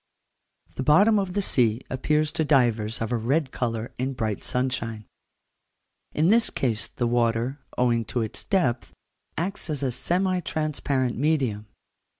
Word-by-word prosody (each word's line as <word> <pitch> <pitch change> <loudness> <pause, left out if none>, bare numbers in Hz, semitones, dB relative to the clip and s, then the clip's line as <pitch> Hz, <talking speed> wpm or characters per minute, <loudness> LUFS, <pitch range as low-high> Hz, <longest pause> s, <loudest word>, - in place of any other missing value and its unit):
The - - -1
bottom 200 +10 +5
of 190 -2 -2
the 200 +1 0
sea 120 - +1
appears 150 +4 0
to 160 0 0
divers 120 -7 +2
of 115 - -2
a 120 - +1
red 135 +5 0
colour 115 -1 -3
in 130 +2 -1
bright 110 -5 -3
sunshine: 120 -4 -2 1.1
in 160 +4 +2
this 230 +2 +4
case 115 -5 -1
the 120 - -2
water, 120 +3 +1 0.2
owing 120 -2 +2
to 125 - -2
its 110 - -5
depth, 150 -12 0 0.4
acts 180 +1 -3
as 145 -2 -2
a 130 - +1
semi 180 +8 0
transparent 145 -6 -1
medium. 130 -9 0
130 Hz, 150 wpm, -25 LUFS, 115-155 Hz, 1.1 s, bottom